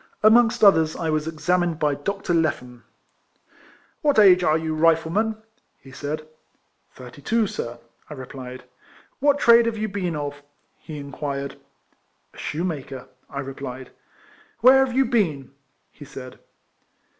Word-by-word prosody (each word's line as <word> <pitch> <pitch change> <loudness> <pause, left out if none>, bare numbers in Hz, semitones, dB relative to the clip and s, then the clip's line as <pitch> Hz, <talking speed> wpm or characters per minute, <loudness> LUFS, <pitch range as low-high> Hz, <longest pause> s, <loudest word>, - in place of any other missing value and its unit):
Amongst 230 +1 +5
others 160 -6 +5
I 165 -2 -2
was 155 0 -1
examined 170 +1 0
by 150 -2 +1
Dr. 180 +6 -3
Lephan. 125 -7 -1 0.6
" - - -30
What 290 -5 +2
age 185 -4 +7
are 155 -1 +3
you, 160 -1 -3
Rifleman?" 165 +7 +2 0.4
he 135 - -15
said. 150 +3 -5 0.3
" - - -46
Thirty 125 +3 -12
two, 225 +7 +1
sir," 120 - -5 0.3
I 150 - -7
replied. 130 -1 -9 0.3
" - - -29
What 285 0 +3
trade 235 -3 +6
have 225 -1 -2
you 215 0 -2
been 190 -5 -3
of? 145 -1 -5 0.2
" - - -44
he 155 - -9
in 140 -1 -8
quired. 140 0 -4 0.4
" - - -45
A - - -18
shoemaker," 150 -5 -4 0.2
I 140 - -5
replied. 130 -2 -8 0.4
" - - -29
Where 265 +3 +7
have 255 -2 -3
you 270 - +4
been?" 165 - 0 0.4
he 150 - -13
said. 135 -3 -10
160 Hz, 155 wpm, -23 LUFS, 140-205 Hz, 0.6 s, age